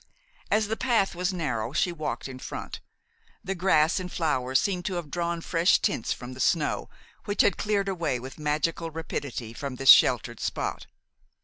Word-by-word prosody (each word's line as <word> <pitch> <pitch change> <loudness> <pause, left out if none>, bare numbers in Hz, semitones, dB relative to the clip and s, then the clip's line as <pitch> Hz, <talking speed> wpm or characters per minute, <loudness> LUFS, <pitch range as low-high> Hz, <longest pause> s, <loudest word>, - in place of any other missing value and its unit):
As 215 -1 +2
the 220 - -1
path 225 -6 +1
was 180 +2 -1
narrow 125 -9 -2
she 175 - +1
walked 155 -4 -4
in 130 -1 -9
front. - - -6 0.6
The 195 - -2
grass 170 -2 +3
and 180 -1 -6
flowers 130 -6 +1
seemed 185 -3 -1
to 190 - -2
have 165 -5 -5
drawn 170 -1 -2
fresh 165 +1 +3
tints 115 - -1
from 125 0 -5
the 130 - -11
snow, 155 +2 +1 0.4
which 205 -2 +2
had 195 - +3
cleared 205 -2 0
away 165 -9 -1
with 130 +5 -9
magical 155 +2 -1
rapidity 145 -7 -5
from 135 +1 -5
this 135 0 +1
sheltered - - +6
spot. - - -3
165 Hz, 175 wpm, -27 LUFS, 135-185 Hz, 0.6 s, sheltered